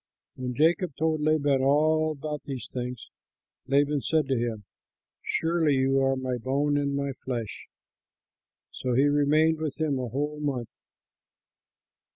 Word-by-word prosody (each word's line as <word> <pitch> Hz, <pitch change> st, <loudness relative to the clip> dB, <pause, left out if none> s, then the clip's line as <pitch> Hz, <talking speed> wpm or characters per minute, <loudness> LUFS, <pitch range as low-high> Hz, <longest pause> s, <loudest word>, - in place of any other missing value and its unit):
When 125 Hz, -1 st, -4 dB
Jacob 165 Hz, -, +2 dB
told 160 Hz, -1 st, 0 dB
Laban 145 Hz, -3 st, +2 dB
all 155 Hz, +3 st, +3 dB
about 150 Hz, 0 st, -5 dB
these 135 Hz, -3 st, -6 dB
things, 125 Hz, -2 st, -5 dB, 0.6 s
Laban 145 Hz, +1 st, +2 dB
said 155 Hz, +4 st, +1 dB
to 135 Hz, -, +2 dB
him, 115 Hz, -3 st, -2 dB, 0.6 s
"Surely 160 Hz, -3 st, +1 dB
you 135 Hz, +1 st, +2 dB
are 135 Hz, 0 st, +2 dB
my 130 Hz, -1 st, -2 dB
bone 140 Hz, +4 st, 0 dB
and 140 Hz, -1 st, 0 dB
my 140 Hz, 0 st, -1 dB
flesh." 120 Hz, -5 st, -5 dB, 1.0 s
So 125 Hz, -2 st, -2 dB
he 135 Hz, +3 st, +4 dB
remained 150 Hz, +2 st, +3 dB
with 155 Hz, -2 st, -4 dB
him 150 Hz, -4 st, 0 dB
a 125 Hz, -, -3 dB
whole 145 Hz, +5 st, -3 dB
month. 130 Hz, -6 st, -3 dB
140 Hz, 140 wpm, -27 LUFS, 130-155 Hz, 1.0 s, he